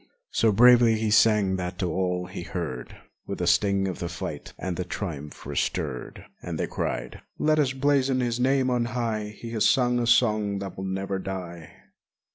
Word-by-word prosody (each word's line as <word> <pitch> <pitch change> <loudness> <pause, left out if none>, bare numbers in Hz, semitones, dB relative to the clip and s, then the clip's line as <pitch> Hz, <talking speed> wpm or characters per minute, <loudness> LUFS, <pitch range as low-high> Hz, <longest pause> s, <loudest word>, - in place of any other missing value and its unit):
So 110 - +3
bravely 120 +1 +6
he 110 -1 -1
sang 105 -3 +4
that 90 +1 -4
all 90 +1 -1
who 90 0 -7
heard 80 -9 -5 0.3
With - - -4
the 90 - -2
sting 95 +2 +2
of 95 - -4
the 85 - -3
fight 80 -3 -6
and 95 -2 -3
the 90 - -2
triumph 80 -6 -6
were - - -5
stirred. 60 - -3 0.2
And - - -5
they - - +1
cried, 65 0 -4 0.2
*'Let 155 0 +2
us 140 -3 +2
blazon 135 -1 +2
his 120 -1 -1
name 130 0 +2
on 120 -1 +1
high, 110 -3 -1
He 115 - -8
has 110 -2 +3
sung 125 -2 +2
a 120 - 0
song 110 -4 +3
that 100 -2 -6
will 95 - -5
never 95 0 -2
die!" 90 -4 -6
100 Hz, 185 wpm, -26 LUFS, 90-120 Hz, 0.3 s, bravely